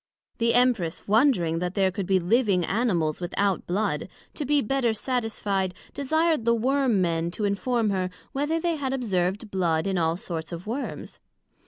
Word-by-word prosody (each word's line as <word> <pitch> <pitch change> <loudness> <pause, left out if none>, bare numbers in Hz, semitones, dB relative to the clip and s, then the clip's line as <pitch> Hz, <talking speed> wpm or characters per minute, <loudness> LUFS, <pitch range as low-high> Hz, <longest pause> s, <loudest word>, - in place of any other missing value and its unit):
The 230 0 +2
Empress 235 -10 +2
wondring 205 - +3
that 180 +1 -3
there 190 -2 +2
could 185 0 -4
be 190 -1 +3
living 195 -1 +2
Animals 180 -9 0
without 190 +2 -1
Blood, 200 +5 -1 0.2
to 295 - -4
be 290 +2 +3
better 245 -2 +1
satisfied, 210 -6 -1 0.2
desired 315 0 +1
the 235 0 +3
Worm 255 -3 +2
men 165 -1 0
to 205 +4 -3
inform 215 +2 0
her, 185 -2 -1 0.2
whether 295 +4 0
they 335 -1 0
had 270 -2 -2
observed 205 -4 -1
Blood 165 -4 +1
in 190 -2 0
all 165 0 +1
sorts 165 -2 -5
of 170 +1 -6
Worms? 240 +6 -5
205 Hz, 165 wpm, -26 LUFS, 180-250 Hz, 0.2 s, wondring